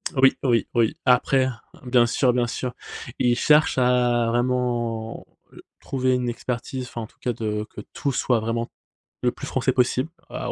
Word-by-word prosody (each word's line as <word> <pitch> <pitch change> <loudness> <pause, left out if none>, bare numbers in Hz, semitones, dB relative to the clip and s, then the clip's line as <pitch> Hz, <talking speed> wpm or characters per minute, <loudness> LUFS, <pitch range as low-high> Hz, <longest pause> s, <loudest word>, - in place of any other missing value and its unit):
Oui, 135 0 +5
oui, 120 -3 +2
oui. 115 -2 +2
Après 130 +1 +4 0.4
bien 120 -1 +4
sûr 125 +1 +2
bien 120 -1 +1
sûr. 125 +1 -4 0.5
Il 120 -1 +3
cherche 150 -2 +4
à 125 -2 +3
vraiment, 120 -2 -1 0.3
heu, - - -14 0.2
trouver 130 -1 0
une 125 -1 0
expertise, 125 +2 -4
enfin 115 - -6
en 110 - -6
tout - - -29
cas 125 - -1
de 105 -1 -3
que 105 - -9
tout 140 - -1
soit 125 -2 +1
vraiment 115 +1 -2 0.5
le - - +2
plus - - -8
français - - +1
possible, 130 +4 +1 0.2
à - - -4
125 Hz, 170 wpm, -24 LUFS, 115-125 Hz, 0.5 s, Oui